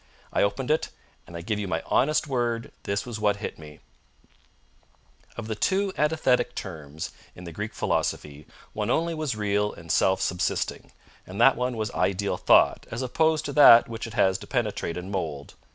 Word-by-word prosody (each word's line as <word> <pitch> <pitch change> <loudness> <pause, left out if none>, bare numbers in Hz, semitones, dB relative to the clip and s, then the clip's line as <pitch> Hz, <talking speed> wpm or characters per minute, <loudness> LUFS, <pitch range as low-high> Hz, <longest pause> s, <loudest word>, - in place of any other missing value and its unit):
I - - +2
opened 125 +7 0
it, 155 - +1 0.4
and 85 - -8
I - - -6
give 105 +4 -2
you 100 - -3
my 80 -2 -2
honest 150 +4 +2
word 120 -4 -2
this 100 0 -2
was 120 -3 -6
what 105 -1 +2
hit 100 - -6
me: 75 -1 -13 1.6
_Of 120 - -5
the 110 - -3
two 190 - 0
antithetic 150 -4 +1
terms 80 -5 -7 0.2
in 90 - -11
the 85 - -8
Greek 105 +6 -6
philosophy 75 0 -2 0.3
one 105 0 -2
only 165 +5 +1
was 155 -7 -2
real 105 0 0
and 85 -1 -8
self 95 0 +3
subsisting; 90 - -2 0.4
and 95 +2 -8
that 130 +3 +6
one 125 0 -2
was 110 -1 -2
Ideal 100 +1 0
Thought - - +4
as 115 +3 -4
opposed 155 +4 +1
to 145 - -4
that 120 -5 +8
which 115 0 -6
it 115 - -10
has 95 0 +2
to - - -11
penetrate 105 -8 -2
and 90 +2 -6
mould. 75 -7 -4
105 Hz, 185 wpm, -26 LUFS, 95-125 Hz, 1.6 s, that